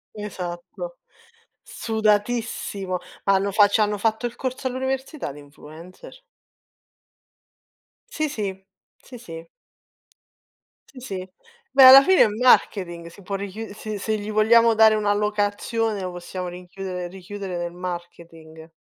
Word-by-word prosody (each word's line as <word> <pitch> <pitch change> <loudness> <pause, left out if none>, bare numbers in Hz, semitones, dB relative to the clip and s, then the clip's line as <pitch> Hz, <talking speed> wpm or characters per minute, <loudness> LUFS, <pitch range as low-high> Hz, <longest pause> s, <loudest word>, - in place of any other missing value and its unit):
Esatto. 205 - -7 0.6
Sudatissimo, 215 -3 -1 0.3
hanno 195 0 +2
fa 205 +1 +6
c'hanno 210 0 +1
fatto 220 +2 0
il 240 - -4
corso 260 0 -5
all'università 265 - -3
di 145 - -12
influencer. 155 - -14 1.9
Sì, 310 -8 -1
sì. 195 -7 -5 0.4
Sì, 250 - -12
sì. 165 -7 -10 1.4
Si, 265 - -14
si. 190 -6 -6 0.4
Beh 270 0 +6
alla 260 +1 +11
fine 375 +5 +4
è - - +4
marketing, 195 -6 +2
si 170 +4 -14
può 195 +2 -5
richiu 200 +2 -6
se 215 -1 -6
se 215 +2 -1
gli 210 +1 -6
vogliamo 230 +2 +5
dare 220 0 +6
una 210 -1 +1
allocazione 210 +1 -1
lo 185 - -4
possiamo 180 +1 -6
rinchiudere 180 0 -6
richiudere 190 0 -7
nel 175 0 -4
marketing. 170 -3 -9
205 Hz, 120 wpm, -23 LUFS, 180-225 Hz, 1.9 s, alla